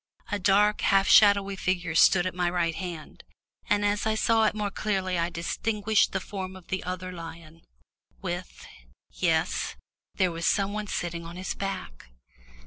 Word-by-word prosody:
A 205 - -1
dark, 205 +2 +3
half 195 0 +3
shadowy 200 -3 +6
figure 180 -3 -1
stood 175 +2 +5
at 185 - -2
my 180 0 0
right 175 -2 0
hand, 170 -3 -7 0.5
and 205 0 +2
as 205 +1 0
I 220 - +1
saw 225 0 +3
it 215 - +1
more 210 -1 -2
clearly 190 -4 -1
I 170 +1 0
distinguished 210 +5 0
the 190 - -1
form 190 -1 -6
of 185 -2 -14
the 190 - -2
other 185 +1 -5
lion, 165 -1 -10 0.6
with 180 -1 -6 0.5
yes, - - 0 0.4
there 185 -2 +2
was 165 0 -2
some 200 0 +1
one 210 0 -4
sitting 170 -3 -3
on 165 +1 -9
his 185 +1 -4
back. 130 - -6
185 Hz, 165 wpm, -27 LUFS, 175-205 Hz, 0.6 s, shadowy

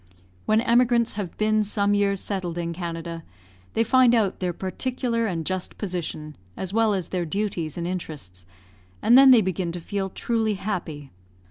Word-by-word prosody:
When 215 +1 +4
emigrants 235 -1 +3
have 200 -5 -5
been 215 0 +2
some 205 0 +1
years 200 -1 +1
settled 180 -4 -3
in 170 -1 -2
Canada, 165 -1 -5 0.5
they 225 - +2
find 250 +1 +5
out 210 -5 +1
their 180 -1 -1
particular 230 +5 -2
and 165 -5 -3
just 185 +1 -3
position, 165 -6 -5 0.2
as 190 0 -4
well 220 -2 +3
as 185 -4 -3
their 180 -2 -1
duties 170 -3 -3
and 170 - -3
interests, 145 - -6 0.6
and 235 - +6
then 270 +1 +9
they 250 -3 +8
begin 185 -2 -2
to 175 - -4
feel 195 +3 -3
truly 220 +1 -1
happy. 170 -8 -5
195 Hz, 165 wpm, -24 LUFS, 170-220 Hz, 0.6 s, then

